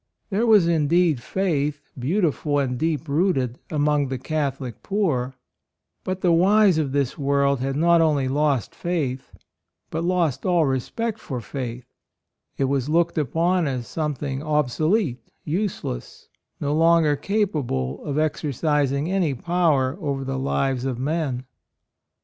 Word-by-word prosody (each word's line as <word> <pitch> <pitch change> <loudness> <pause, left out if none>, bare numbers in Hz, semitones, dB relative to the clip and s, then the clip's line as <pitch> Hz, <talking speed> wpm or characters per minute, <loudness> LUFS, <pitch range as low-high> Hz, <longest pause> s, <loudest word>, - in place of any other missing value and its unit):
There 215 +5 +1
was 210 -6 +6
indeed 165 -2 +2
faith, 150 -5 -2
beautiful 150 0 0
and 130 -3 0
deep 160 +3 -1
rooted, 140 -6 0
among 150 -2 +1
the 130 0 -3
Catholic 135 -4 -3
poor; 140 -11 -1 0.7
but 185 0 -3
the 180 - +3
wise 190 +1 +5
of 145 -4 -1
this 140 +2 -1
world 140 -1 +2
had 135 +1 -2
not 170 +2 +4
only 150 -5 +2
lost 140 -3 0
faith, 145 -7 -3 0.6
but 160 +1 -2
lost 170 -7 0
all 175 -3 +3
respect 210 - -2
for 130 - -5
faith; 125 0 -6 0.7
it - - 0
was 135 0 0
looked 170 +1 +2
upon 165 +4 +1
as 130 -3 -3
something 145 -3 -3
obselete, 155 - +1 0.2
use 190 +5 -2
less, - - -7 0.3
no 145 0 -1
longer 165 -1 +4
capable 145 - -1
of 145 - -3
exer 155 0 0
cising 145 +1 0
any 175 -8 +1
power 160 -2 +1
over 140 -3 -2
the 135 0 -3
lives 135 -1 0
of 130 -3 -2
men. 135 -2 -2
150 Hz, 140 wpm, -23 LUFS, 135-170 Hz, 0.7 s, was